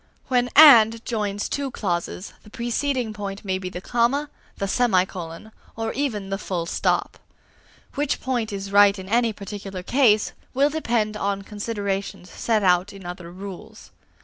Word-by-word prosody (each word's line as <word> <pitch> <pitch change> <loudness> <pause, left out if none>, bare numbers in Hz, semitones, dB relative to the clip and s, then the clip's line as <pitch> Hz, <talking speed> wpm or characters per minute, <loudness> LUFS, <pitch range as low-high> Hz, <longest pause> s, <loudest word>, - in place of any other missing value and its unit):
When 245 -1 +2
"and" 230 -7 +8
joins 210 -3 -2
two 280 -1 -2
clauses, 180 -3 -3
the 210 - -16
preceding 240 +1 -2
point 200 -1 -6
may 190 -1 -1
be 185 -1 -5
the 180 0 -7
comma, 250 +7 0 0.3
the 195 - -2
semicolon, 190 -4 0 0.2
or 225 0 -3
even 215 -9 -2
the 195 - -2
full 175 -5 -3
stop. - - -1 0.7
Which 290 0 -1
point 240 -4 -2
is 195 0 -5
right 205 0 +6
in 190 0 -8
any 230 +2 +2
particular 200 -2 -7
case, 220 -3 +3 0.2
will 280 +3 +3
depend 230 -8 -1
upon 200 -1 -2
considerations 200 -3 -4
set 220 -3 0
out 180 +2 +3
in 195 -2 -12
other 175 -1 -7
rules. 190 0 -10
210 Hz, 150 wpm, -23 LUFS, 195-235 Hz, 0.7 s, and